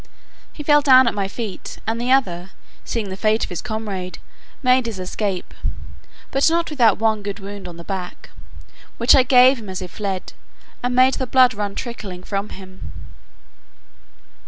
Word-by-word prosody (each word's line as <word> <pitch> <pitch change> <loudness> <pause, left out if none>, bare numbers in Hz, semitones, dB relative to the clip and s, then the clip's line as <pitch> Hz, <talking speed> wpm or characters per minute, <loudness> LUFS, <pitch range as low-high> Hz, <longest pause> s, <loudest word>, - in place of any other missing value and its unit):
He 300 - -8
fell 295 0 +5
down 260 -3 +7
at - - +1
my 200 -2 -1
feet; 205 -1 -6
and 225 +2 -2
the 245 +1 0
other, 185 -9 +1 0.3
seeing 220 -4 -3
the 190 - -5
fate 215 +3 +1
of - - -5
his 175 - -4
comrade, 205 -5 -5 0.5
made 255 -1 +4
his 225 -4 -5
escape, 185 0 -3 0.8
but 275 +3 +3
not 335 0 0
without 235 -8 +4
one 220 -1 +1
good 200 0 -5
wound 200 -1 -8
on 170 -1 -9
the 170 - -9
back, 185 -1 -6 0.7
which 235 +2 +5
I 265 - +7
gave 255 0 +6
him 210 -3 -9
as 185 - -4
he 185 - -4
fled, 190 0 -5 0.5
and 245 0 -1
made 255 +1 +5
the 260 - -2
blood 255 0 +5
run 205 -1 -4
trickling 200 -7 -6
from 200 +2 -3
him. 185 -1 -10
215 Hz, 175 wpm, -21 LUFS, 190-250 Hz, 0.8 s, down